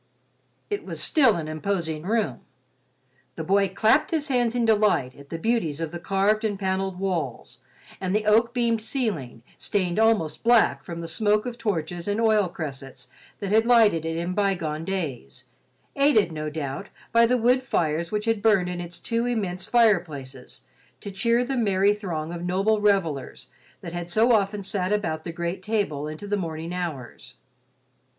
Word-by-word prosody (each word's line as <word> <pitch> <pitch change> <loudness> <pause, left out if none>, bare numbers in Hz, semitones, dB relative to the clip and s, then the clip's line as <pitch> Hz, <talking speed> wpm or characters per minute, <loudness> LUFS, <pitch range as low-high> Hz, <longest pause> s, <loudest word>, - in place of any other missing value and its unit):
It 410 - -2
was - - -7
still 265 -8 +4
an 160 -2 -4
imposing 160 -1 -2
room. 200 - -1 1.0
The 160 - -4
boy 195 +3 +2
clapped 215 +4 +3
his 310 -2 -1
hands 245 -3 +1
in 240 -1 +1
delight 210 - +2
at 140 0 -15
the 165 - -4
beauties 165 -6 -1
of 165 -2 -3
the 175 - -6
carved 195 +4 +1
and 210 -3 -1
panelled 190 -1 -2
walls 190 -2 -3 0.4
and 185 +1 -1
the 215 0 0
oak 225 +2 +4
beamed 235 -2 0
ceiling, 215 - -3 0.2
stained 185 -1 -1
almost 220 -9 +2
black 225 -13 +4
from 170 -1 -6
the 165 - -5
smoke 210 +5 +1
of 240 -1 -6
torches 175 -5 -3
and 205 +2 0
oil 215 -4 +3
cressets 140 -6 -7 0.3
that 200 -1 -4
had 220 +2 +4
lighted 220 -9 +5
it 165 0 -3
in 170 +2 -2
bygone 175 -6 -1
days, 150 -9 -4 0.5
aided, 275 - +3
no 155 -1 -4
doubt, 150 +4 -5 0.2
by 230 0 +5
the 250 +1 +2
wood 250 +2 +3
fires 165 -8 -1
which 210 0 -2
had 225 -2 0
burned 200 -4 +3
in 175 -1 -4
its 175 0 -6
two 230 +1 -1
immense 195 -7 -2
fireplaces 160 - 0 0.4
to 200 - -7
cheer 235 +5 +1
the 270 +2 -2
merry 200 -4 +3
throng 170 -6 -4
of 170 0 -6
noble 195 +4 +1
revellers 185 -10 0 0.3
that 170 - -7
had 175 0 -5
so 225 +7 +3
often 205 -2 +1
sat 190 0 -2
about 160 -7 -1
the 170 - -4
great 170 +2 -4
table 185 -8 -1
into 155 +6 -7
the 205 - 0
morning 165 -2 -4
hours. 170 -8 -6
195 Hz, 170 wpm, -25 LUFS, 165-220 Hz, 1.0 s, lighted